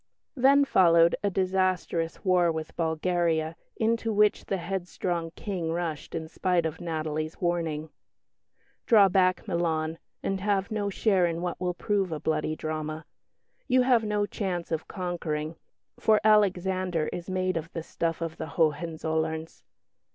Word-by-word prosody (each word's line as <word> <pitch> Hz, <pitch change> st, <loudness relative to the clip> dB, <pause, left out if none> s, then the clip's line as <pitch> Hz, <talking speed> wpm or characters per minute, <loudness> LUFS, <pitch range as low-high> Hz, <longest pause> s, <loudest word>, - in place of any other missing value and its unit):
Then 280 Hz, +2 st, +5 dB
followed 170 Hz, -7 st, +5 dB
a 200 Hz, -, +2 dB
disastrous 185 Hz, -3 st, 0 dB
war 180 Hz, -2 st, +4 dB
with 160 Hz, -1 st, -5 dB
Bulgaria 165 Hz, -1 st, 0 dB, 0.2 s
into 225 Hz, 0 st, +1 dB
which 210 Hz, 0 st, +3 dB
the 195 Hz, -, -1 dB
headstrong 175 Hz, -2 st, -3 dB
King 180 Hz, -6 st, -3 dB
rushed 165 Hz, -3 st, -3 dB
in 160 Hz, -1 st, -4 dB
spite 175 Hz, +1 st, 0 dB
of 160 Hz, +1 st, -4 dB
Natalie's 155 Hz, -1 st, -3 dB
warning 165 Hz, -3 st, -1 dB, 1.0 s
"Draw 205 Hz, -4 st, +7 dB
back, 185 Hz, +1 st, +2 dB
Milan, 165 Hz, -3 st, -1 dB, 0.2 s
and 195 Hz, 0 st, -1 dB
have 200 Hz, +1 st, 0 dB
no 205 Hz, -2 st, -1 dB
share 190 Hz, -3 st, +2 dB
in 165 Hz, 0 st, -2 dB
what 175 Hz, 0 st, -3 dB
will 180 Hz, -1 st, -1 dB
prove 195 Hz, 0 st, 0 dB
a 155 Hz, -, -3 dB
bloody 155 Hz, 0 st, -1 dB
drama. 155 Hz, 0 st, -4 dB, 0.6 s
You 255 Hz, -1 st, +4 dB
have 245 Hz, -3 st, +4 dB
no 210 Hz, -1 st, 0 dB
chance 180 Hz, -5 st, -3 dB
of 160 Hz, -1 st, -2 dB
conquering, 165 Hz, -4 st, -3 dB, 0.4 s
for 215 Hz, -1 st, +4 dB
Alexander 185 Hz, -5 st, +2 dB
is 175 Hz, +1 st, -6 dB
made 185 Hz, -1 st, 0 dB
of 165 Hz, +1 st, -4 dB
the 165 Hz, -, -4 dB
stuff 165 Hz, 0 st, -2 dB
of 165 Hz, -1 st, -4 dB
the 160 Hz, -, -5 dB
Hohenzollerns." 160 Hz, 0 st, -1 dB
175 Hz, 145 wpm, -27 LUFS, 160-190 Hz, 1.0 s, Draw